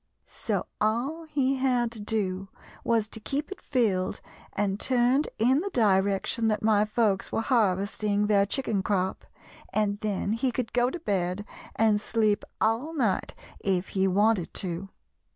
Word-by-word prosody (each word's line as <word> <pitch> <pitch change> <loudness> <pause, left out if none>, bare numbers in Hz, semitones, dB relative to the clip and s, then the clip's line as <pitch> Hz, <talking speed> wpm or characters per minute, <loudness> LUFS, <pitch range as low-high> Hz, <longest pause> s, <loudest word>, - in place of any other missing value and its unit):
So - - -3 0.2
all 250 +10 0
he 275 -3 0
had 250 -3 +1
to 230 - -8
do 195 -3 -2 0.4
was 225 -2 +1
to 220 - -7
keep 285 - -3
it 390 - -7
filled 205 -8 0 0.3
and 200 0 -1
turned 255 +3 +2
in 255 +5 +3
the 400 +5 -2
direction 200 - +2
that 215 -1 0
my 210 -1 +4
folks 215 -3 0
were - - 0
harvesting 210 -3 +1
their 200 -1 +3
chicken 220 -4 0
crop, 190 -1 -1 0.5
and 205 0 0
then 210 -1 -1
he 245 +3 0
could 240 -2 -3
go 245 0 +3
to 345 - -6
bed 190 - -1 0.3
and 215 -2 +3
sleep 215 -1 +1 0.2
all 235 +9 0
night 225 -10 0 0.2
if 190 -2 0
he 190 0 +1
wanted 200 -1 +2
to. 185 +1 -3
215 Hz, 150 wpm, -27 LUFS, 200-245 Hz, 0.5 s, my